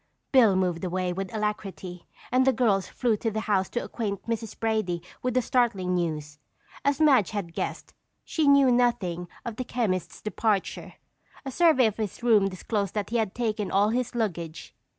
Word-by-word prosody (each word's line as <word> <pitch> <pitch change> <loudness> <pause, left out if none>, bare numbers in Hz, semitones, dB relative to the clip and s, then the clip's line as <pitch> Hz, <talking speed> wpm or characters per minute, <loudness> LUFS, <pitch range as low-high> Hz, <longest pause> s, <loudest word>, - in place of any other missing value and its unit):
Bill 230 -8 +6
moved 180 -2 0
away 180 0 -1
with 190 +1 -4
alacrity 200 -4 -4 0.2
and 255 +1 +4
the - - +7
girls 220 -6 +1
flew 240 -4 0
to 225 - -1
the 220 0 -3
house 200 -4 +1
to 240 - -2
acquaint 200 -4 -4
Mrs. 225 -2 -4
Brady 215 -7 -1 0.2
with 250 -1 -1
the 255 - +3
startling 205 -9 +1
news. 155 -4 -2 0.4
As 280 +1 +1
Madge 270 - +5
had 195 -6 -4
guessed, - - -4 0.3
she 315 -3 0
knew 280 -2 +6
nothing 190 -8 +1 0.2
of 235 -2 -5
the 255 - -2
chemist's 200 -9 -2
departure. 215 -1 -2 0.5
A 270 - -4
survey 315 -4 +4
of 215 -2 0
his 215 +1 -4
room 215 -5 +5
disclosed 200 +1 -3
that 210 0 -2
he 240 - +1
had 220 -4 -1
taken 215 -4 -1
all 200 +2 +3
his 245 +1 -1
luggage. 170 -8 -3
215 Hz, 175 wpm, -26 LUFS, 185-240 Hz, 0.5 s, the